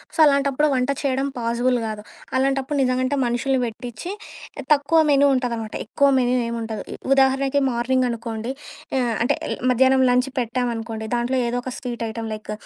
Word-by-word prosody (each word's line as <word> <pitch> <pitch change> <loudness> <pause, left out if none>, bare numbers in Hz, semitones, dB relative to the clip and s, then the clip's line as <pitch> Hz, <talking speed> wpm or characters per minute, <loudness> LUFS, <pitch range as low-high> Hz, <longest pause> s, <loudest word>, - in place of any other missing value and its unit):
So, - - -10
అలాంటప్పుడు 280 +1 +2
వంట 250 +1 0
చేయడం 270 -1 0
పాజిబుల్ 240 +2 +1
గాదు. 215 -1 -5 0.4
అలాంటప్పుడు 270 +2 0
నిజంగా 255 0 +1
అంటే 270 +2 0
మనుషుల్ని 245 +3 0
పెట్టిచ్చి 235 +6 -7 0.6
తక్కువ 290 +3 +2
మెనూ 280 0 +5
ఉంటాదనమాట. 235 -4 -3
ఎక్కువ 280 +6 +2
మెనూ 250 0 +1
ఏమి 235 0 -3
ఉండదు. 225 -1 -4 0.3
ఉ - - -1
ఉదాహరణకి 270 +1 +3
మార్నింగ్ 250 +2 +1
అనుకోండి 230 0 -4 0.5
ఆహ్, 240 -3 0
అంటే 240 - +2 0.4
మధ్యాహ్నం 260 +1 +4
లంచ్ 250 +2 +2
పెట్టామనుకోండి 230 -2 -3
దాంట్లో 240 +2 0
ఏదోక 245 +1 -1
ఒక 255 - -5
స్వీట్ 245 -3 -6
ఐటెం 225 +1 -5
లైక్ 215 0 -7
250 Hz, 155 wpm, -22 LUFS, 235-270 Hz, 0.6 s, మెనూ